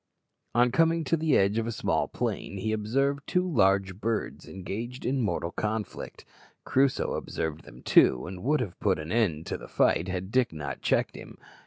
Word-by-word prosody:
On 120 Hz, +1 st, +4 dB
coming 165 Hz, +4 st, +3 dB
to 155 Hz, -, +1 dB
the 155 Hz, -3 st, +2 dB
edge 100 Hz, +3 st, +2 dB
of 115 Hz, -, -2 dB
a -, -, -1 dB
small -, -, 0 dB
plain 100 Hz, -, -3 dB
he 110 Hz, +3 st, -2 dB
observed 135 Hz, +7 st, 0 dB
two 180 Hz, 0 st, +1 dB
large 95 Hz, -, +2 dB
birds 115 Hz, -1 st, -2 dB
engaged 115 Hz, +7 st, -6 dB
in 130 Hz, +1 st, +1 dB
mortal 95 Hz, -6 st, -1 dB
conflict. 105 Hz, +2 st, -4 dB, 0.4 s
Crusoe 135 Hz, 0 st, +2 dB
observed 80 Hz, -1 st, -4 dB
them 65 Hz, -, -14 dB
too, 60 Hz, -, +5 dB
and 90 Hz, 0 st, -7 dB
would 150 Hz, +2 st, +2 dB
soon 115 Hz, -, -2 dB
have -, -, -24 dB
put -, -, +2 dB
an 80 Hz, +2 st, -6 dB
end 90 Hz, -9 st, +1 dB
to -, -, -4 dB
the -, -, -10 dB
fight 85 Hz, -, +2 dB
had 95 Hz, +1 st, -4 dB
Dick 125 Hz, -1 st, +2 dB
not 75 Hz, -2 st, -5 dB
checked -, -, +1 dB
him. -, -, -10 dB
110 Hz, 190 wpm, -28 LUFS, 95-130 Hz, 0.4 s, too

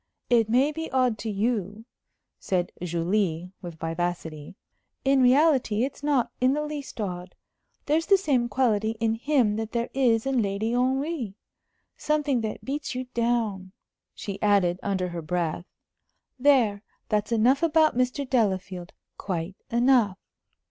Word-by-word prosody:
"It 230 Hz, -2 st, +4 dB
may 260 Hz, +6 st, +3 dB
be 320 Hz, +1 st, -5 dB
odd 255 Hz, -4 st, +1 dB
to 225 Hz, -, -4 dB
you," 210 Hz, 0 st, -2 dB, 0.5 s
said 180 Hz, -2 st, -1 dB
Julie, 175 Hz, 0 st, -1 dB
with 175 Hz, -3 st, -7 dB
vivacity. 165 Hz, -1 st, -4 dB, 0.5 s
"In 270 Hz, 0 st, +4 dB
reality, 255 Hz, -4 st, +4 dB
it's 270 Hz, +1 st, -4 dB
not 285 Hz, -4 st, +1 dB
in 255 Hz, +1 st, +4 dB
the 300 Hz, +1 st, -1 dB
least 295 Hz, -5 st, -7 dB
odd. 180 Hz, -3 st, -5 dB, 0.5 s
There's 315 Hz, +3 st, +1 dB
the 395 Hz, -, +6 dB
same 265 Hz, -10 st, +1 dB
quality 225 Hz, -4 st, +1 dB
in 225 Hz, -1 st, +1 dB
him 235 Hz, -3 st, +1 dB
that 220 Hz, 0 st, -4 dB
there 235 Hz, 0 st, -2 dB
is 240 Hz, -4 st, +2 dB
in 270 Hz, -3 st, +1 dB
Lady 205 Hz, +2 st, -1 dB
Henry 260 Hz, -, -1 dB, 0.6 s
something 295 Hz, -5 st, 0 dB
that 220 Hz, -1 st, -5 dB
beats 285 Hz, -1 st, -3 dB
you 255 Hz, 0 st, -5 dB
down," 225 Hz, -6 st, -1 dB, 0.4 s
she 200 Hz, -1 st, -6 dB
added, 195 Hz, -4 st, +3 dB
under 190 Hz, -2 st, -1 dB
her 170 Hz, -1 st, -5 dB
breath. 170 Hz, +1 st, -2 dB, 0.7 s
"There, 245 Hz, -7 st, +3 dB, 0.3 s
that's 210 Hz, +1 st, 0 dB
enough 240 Hz, +5 st, +3 dB
about 320 Hz, -3 st, +3 dB
Mr. 255 Hz, +2 st, 0 dB
Delafield 190 Hz, -7 st, -1 dB, 0.3 s
quite 180 Hz, -1 st, -3 dB
enough." 235 Hz, -5 st, +3 dB
225 Hz, 140 wpm, -26 LUFS, 195-265 Hz, 0.7 s, the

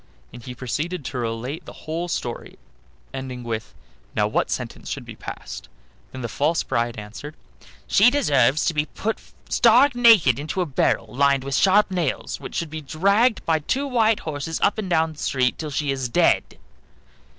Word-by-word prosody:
and 120 Hz, -, -11 dB
he 125 Hz, -, -7 dB
proceeded 150 Hz, +6 st, -3 dB
to 130 Hz, -1 st, -4 dB
relate 120 Hz, +8 st, -4 dB
the -, -, -10 dB
whole 165 Hz, +3 st, -3 dB
story, 120 Hz, -8 st, -5 dB, 0.6 s
ending 130 Hz, -2 st, -6 dB
up -, -, -11 dB
with, 110 Hz, -2 st, -4 dB, 0.4 s
"Now -, -, +2 dB
what -, -, 0 dB
sentence -, -, -5 dB
should -, -, -5 dB
be -, -, -9 dB
passed?" -, -, -8 dB, 0.4 s
Then 130 Hz, -1 st, -7 dB
the -, -, -1 dB
false 150 Hz, +8 st, 0 dB
bride 120 Hz, 0 st, -1 dB
answered: 110 Hz, +8 st, -8 dB, 0.5 s
"She 210 Hz, +5 st, +5 dB
deserves 145 Hz, -, +2 dB
to 170 Hz, -, +1 dB
be 150 Hz, 0 st, 0 dB
put 220 Hz, +1 st, -3 dB, 0.3 s
stark 250 Hz, +4 st, +5 dB
naked 220 Hz, -, +5 dB
into 155 Hz, +5 st, -4 dB
a -, -, +1 dB
barrel 135 Hz, -5 st, +1 dB
lined 135 Hz, +4 st, +2 dB
with 140 Hz, 0 st, -4 dB
sharp 195 Hz, +6 st, +4 dB
nails, 170 Hz, -7 st, -2 dB
which -, -, -8 dB
should 165 Hz, -4 st, -3 dB
be 160 Hz, 0 st, -5 dB
dragged 200 Hz, -, +2 dB
by 160 Hz, -1 st, +2 dB
two 265 Hz, -, -1 dB
white 225 Hz, -5 st, +2 dB
horses 155 Hz, +1 st, -4 dB
up 205 Hz, -, +2 dB
and 195 Hz, -3 st, -4 dB
down 160 Hz, -2 st, +2 dB
the 155 Hz, -, -15 dB
street 125 Hz, -2 st, 0 dB
till 155 Hz, -1 st, -4 dB
she 145 Hz, 0 st, -1 dB
is 130 Hz, -2 st, -2 dB
dead." 115 Hz, -, +2 dB
150 Hz, 185 wpm, -23 LUFS, 130-185 Hz, 0.6 s, She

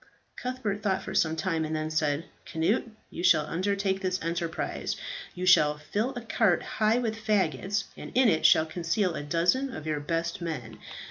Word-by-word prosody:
Cuthbert 245 Hz, -5 st, -3 dB
thought 195 Hz, -3 st, 0 dB
for 190 Hz, -, -6 dB
some 160 Hz, -4 st, +2 dB
time, 165 Hz, -2 st, -1 dB
and 155 Hz, 0 st, -2 dB
then 155 Hz, 0 st, -2 dB
said, 155 Hz, 0 st, 0 dB, 0.2 s
"Cnut, 180 Hz, +10 st, 0 dB, 0.2 s
you 175 Hz, -, -5 dB
shall 155 Hz, -5 st, +5 dB
undertake 195 Hz, +3 st, -1 dB
this 185 Hz, -1 st, -1 dB
enterprise. 170 Hz, 0 st, -2 dB, 0.4 s
You 180 Hz, -, -3 dB
shall 150 Hz, -5 st, +5 dB
fill 205 Hz, -, -2 dB
a 240 Hz, -, -4 dB
cart 220 Hz, -5 st, +2 dB
high 215 Hz, +2 st, +1 dB
with 230 Hz, -3 st, -1 dB
faggots, 195 Hz, -1 st, +1 dB
and -, -, -9 dB
in 255 Hz, 0 st, +5 dB
it 160 Hz, -7 st, +2 dB
shall 160 Hz, -, +6 dB
conceal 175 Hz, +3 st, -1 dB
a -, -, -4 dB
dozen 175 Hz, -, +1 dB
of 155 Hz, -9 st, -7 dB
your 155 Hz, -1 st, -1 dB
best 165 Hz, +4 st, -2 dB
men. 120 Hz, -10 st, -5 dB
175 Hz, 180 wpm, -28 LUFS, 160-205 Hz, 0.4 s, shall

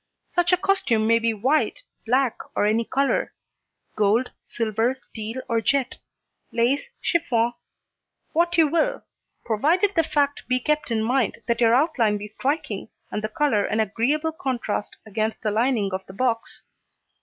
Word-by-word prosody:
Such 350 Hz, 0 st, +1 dB
a 365 Hz, -, +5 dB
costume 345 Hz, -, +1 dB
may 230 Hz, +1 st, +4 dB
be 230 Hz, 0 st, +1 dB
white, 275 Hz, -, 0 dB, 0.2 s
black 255 Hz, 0 st, +2 dB, 0.2 s
and 205 Hz, -, +2 dB
any 225 Hz, +2 st, +1 dB
colour; 275 Hz, +3 st, 0 dB, 0.6 s
gold, 215 Hz, +4 st, +2 dB, 0.2 s
silver, 230 Hz, +2 st, 0 dB
steel 235 Hz, 0 st, -7 dB
or 230 Hz, -2 st, +1 dB
jet; 265 Hz, +2 st, 0 dB, 0.5 s
lace, 240 Hz, +5 st, +1 dB
chiffon 240 Hz, -9 st, +1 dB, 0.8 s
what 340 Hz, +1 st, +2 dB
you 320 Hz, -2 st, +6 dB
will 340 Hz, +12 st, 0 dB, 0.4 s
provided 325 Hz, -, +2 dB
the 330 Hz, -, +5 dB
fact 285 Hz, -2 st, 0 dB
be 255 Hz, 0 st, +2 dB
kept 300 Hz, +2 st, 0 dB
in 220 Hz, -2 st, 0 dB
mind 240 Hz, -1 st, 0 dB
that 235 Hz, 0 st, 0 dB
your 230 Hz, 0 st, +5 dB
outline 250 Hz, -7 st, +2 dB
be 205 Hz, +1 st, -7 dB
striking 225 Hz, -3 st, -2 dB, 0.2 s
and 210 Hz, -, -3 dB
the 215 Hz, -, -1 dB
colour 235 Hz, -4 st, +1 dB
an 215 Hz, -, -1 dB
agreeable 245 Hz, +10 st, +1 dB
contrast 245 Hz, -8 st, -3 dB
against 220 Hz, +1 st, -2 dB
the 215 Hz, -, +1 dB
lining 220 Hz, -3 st, +1 dB
of 190 Hz, 0 st, -3 dB
the 190 Hz, -, -10 dB
box. 230 Hz, +1 st, -1 dB
240 Hz, 155 wpm, -24 LUFS, 220-290 Hz, 0.8 s, you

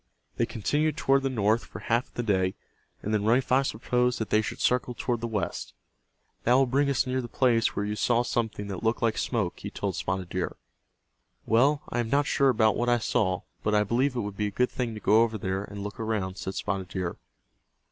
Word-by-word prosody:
They -, -, +1 dB
continued 150 Hz, +7 st, 0 dB
toward 135 Hz, 0 st, +3 dB
the 135 Hz, -, 0 dB
north 110 Hz, -2 st, +1 dB
for -, -, -10 dB
half 115 Hz, +2 st, 0 dB
of -, -, -30 dB
the 120 Hz, -, -2 dB
day, 95 Hz, -4 st, +1 dB, 0.5 s
and 105 Hz, -, -2 dB
then 105 Hz, -1 st, +1 dB
Running 120 Hz, +5 st, +3 dB
Fox 135 Hz, +2 st, +2 dB
proposed 125 Hz, +2 st, 0 dB
that 110 Hz, -, -4 dB
they 110 Hz, -, +4 dB
should 110 Hz, -, -5 dB
circle 125 Hz, 0 st, +1 dB
toward 120 Hz, -2 st, -1 dB
the 115 Hz, -, -2 dB
west. 105 Hz, -6 st, -3 dB, 0.7 s
"That 120 Hz, -, +4 dB
will 135 Hz, +1 st, +5 dB
bring 140 Hz, +3 st, +1 dB
us 135 Hz, -, +2 dB
near 130 Hz, 0 st, -1 dB
the 120 Hz, -, -6 dB
place 120 Hz, -2 st, +2 dB
where 100 Hz, -, -1 dB
you 105 Hz, +1 st, -2 dB
saw 120 Hz, +2 st, +2 dB
something 110 Hz, -4 st, -2 dB
that 95 Hz, -3 st, -5 dB
looked 115 Hz, +1 st, 0 dB
like 115 Hz, -2 st, +2 dB
smoke," 105 Hz, -8 st, -1 dB
he -, -, -5 dB
told -, -, -3 dB
Spotted 90 Hz, -1 st, -2 dB
Deer. 90 Hz, -1 st, -2 dB, 0.9 s
"Well, 135 Hz, +6 st, +3 dB
I 120 Hz, -, -2 dB
am 115 Hz, -2 st, -1 dB
not 140 Hz, +3 st, +3 dB
sure 140 Hz, 0 st, +3 dB
about 110 Hz, -4 st, +3 dB
what 120 Hz, 0 st, 0 dB
I 120 Hz, -, +4 dB
saw, 105 Hz, -5 st, 0 dB, 0.2 s
but 105 Hz, 0 st, +1 dB
I 105 Hz, -, +4 dB
believe 125 Hz, +6 st, +1 dB
it 120 Hz, -, 0 dB
would 100 Hz, -2 st, -5 dB
be 105 Hz, -, 0 dB
a -, -, -2 dB
good 125 Hz, +5 st, 0 dB
thing 120 Hz, -3 st, -3 dB
to -, -, -6 dB
go 105 Hz, +2 st, +4 dB
over 115 Hz, -1 st, +1 dB
there, 95 Hz, 0 st, -2 dB
and 100 Hz, 0 st, -7 dB
look 105 Hz, +2 st, -7 dB
around," 105 Hz, -4 st, -2 dB
said 95 Hz, -, -4 dB
Spotted 95 Hz, -2 st, -2 dB
Deer. 90 Hz, -1 st, -4 dB
115 Hz, 230 wpm, -27 LUFS, 105-125 Hz, 0.9 s, will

